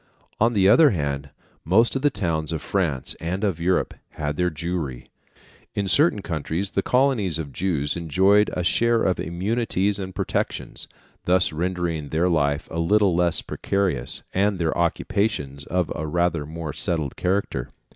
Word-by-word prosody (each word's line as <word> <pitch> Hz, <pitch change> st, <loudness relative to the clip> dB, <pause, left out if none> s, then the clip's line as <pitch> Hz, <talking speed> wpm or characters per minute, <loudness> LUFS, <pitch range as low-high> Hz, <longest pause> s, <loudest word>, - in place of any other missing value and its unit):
On 115 Hz, +2 st, +3 dB
the 95 Hz, -3 st, +4 dB
other 150 Hz, +9 st, +7 dB
hand, 70 Hz, -, -2 dB, 0.3 s
most 110 Hz, -, +3 dB
of 135 Hz, -, -1 dB
the 145 Hz, -, +4 dB
towns 85 Hz, -, -2 dB
of 80 Hz, -2 st, -3 dB
France 80 Hz, -10 st, -1 dB
and 90 Hz, +5 st, -3 dB
of 95 Hz, -6 st, 0 dB
Europe 90 Hz, +2 st, +1 dB, 0.2 s
had 75 Hz, -1 st, -3 dB
their 90 Hz, +2 st, +1 dB
Jewry. 80 Hz, -6 st, -4 dB, 0.7 s
In 100 Hz, -1 st, -1 dB
certain 125 Hz, -, +3 dB
countries, 85 Hz, +2 st, -3 dB
the 95 Hz, -, 0 dB
colonies 125 Hz, -, +2 dB
of 75 Hz, -4 st, -6 dB
Jews 80 Hz, -5 st, -1 dB
enjoyed 95 Hz, +5 st, +3 dB
a 90 Hz, -, -2 dB
share 115 Hz, +5 st, +3 dB
of 95 Hz, -, +1 dB
immunities 100 Hz, +3 st, -1 dB
and 95 Hz, -1 st, -6 dB
protections, 95 Hz, -1 st, -3 dB, 0.4 s
thus 90 Hz, -2 st, +3 dB
rendering 85 Hz, -3 st, -2 dB
their 85 Hz, +3 st, +1 dB
life 75 Hz, -2 st, +1 dB
a 80 Hz, -, -3 dB
little 100 Hz, +1 st, +3 dB
less 85 Hz, -1 st, +1 dB
precarious, 95 Hz, -11 st, -1 dB
and 100 Hz, +1 st, +1 dB
their 85 Hz, -3 st, -1 dB
occupations 85 Hz, -5 st, -1 dB
of 90 Hz, -3 st, -1 dB
a 80 Hz, -, -4 dB
rather 85 Hz, -2 st, 0 dB
more 80 Hz, -1 st, -6 dB
settled 80 Hz, -5 st, -1 dB
character. 95 Hz, +3 st, -1 dB
90 Hz, 155 wpm, -23 LUFS, 80-100 Hz, 0.7 s, other